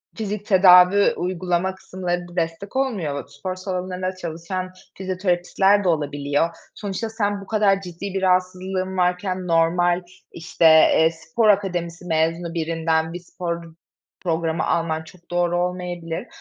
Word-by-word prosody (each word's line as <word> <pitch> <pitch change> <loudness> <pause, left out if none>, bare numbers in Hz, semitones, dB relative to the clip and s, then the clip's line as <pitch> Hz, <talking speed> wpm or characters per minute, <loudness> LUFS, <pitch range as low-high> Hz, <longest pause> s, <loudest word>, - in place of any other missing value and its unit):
fizik 210 -2 -4
tedavi 185 0 +6
uygulama 180 +1 -1
kısımlarında 175 -2 -5
destek 170 +5 -3
olmuyor, 195 - -2
spor 145 +7 -6
salonlarında 185 0 -4
çalışan 185 +2 -5 0.3
fizyoterapistler 190 +1 +1
de 185 - +2
olabiliyor. 145 0 0 0.3
Sonuçta 205 +2 -4
sen 205 -2 -1
bu 195 - -12
kadar 200 -2 +2
ciddi 185 +1 -7
bir 195 - -1
rahatsızlığın 185 0 0
varken 180 +1 0
normal, 175 +2 +2 0.3
işte, 165 0 -2
eee, 160 0 +6
spor 165 +7 0
akademisi 180 -4 0
mezunu 165 +1 0
birinden 165 -1 0
bir 175 - -5
spor 170 -1 -5 0.6
programı 165 -2 -1
alman 160 -1 0
çok 175 +2 -18
doğru 175 0 +1
olmayabilir 180 +1 -3
180 Hz, 125 wpm, -22 LUFS, 165-190 Hz, 0.6 s, tedavi